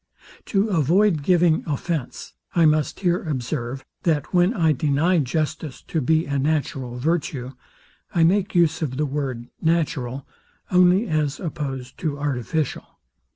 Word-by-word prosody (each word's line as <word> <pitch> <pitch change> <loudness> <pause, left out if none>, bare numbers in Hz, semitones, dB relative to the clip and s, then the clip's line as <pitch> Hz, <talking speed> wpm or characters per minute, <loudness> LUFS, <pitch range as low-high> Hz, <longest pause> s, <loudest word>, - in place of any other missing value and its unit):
To 200 +1 +1
avoid 175 +1 +3
giving 170 0 +3
offence, 150 -1 -3 0.2
I 170 -2 +5
must 155 +2 +1
here 175 -2 +2
observe, 130 -3 -4 0.2
that 155 -1 0
when 180 +2 +4
I 165 -9 +2
deny 155 +5 +2
justice 150 0 -2
to 160 - -2
be 160 +5 +2
a 140 -1 -1
natural 135 -4 -1
virtue, 150 -2 -1 0.6
I 170 - +2
make 195 +4 +2
use 165 -2 +3
of 130 -5 -2
the 150 - +1
word, 135 -4 -4
natural, 150 -6 -1 0.4
only 180 +4 +4
as 155 -4 0
opposed 135 -7 -5
to 150 -3 -2
artificial. 145 +1 -3
155 Hz, 135 wpm, -23 LUFS, 135-170 Hz, 0.6 s, I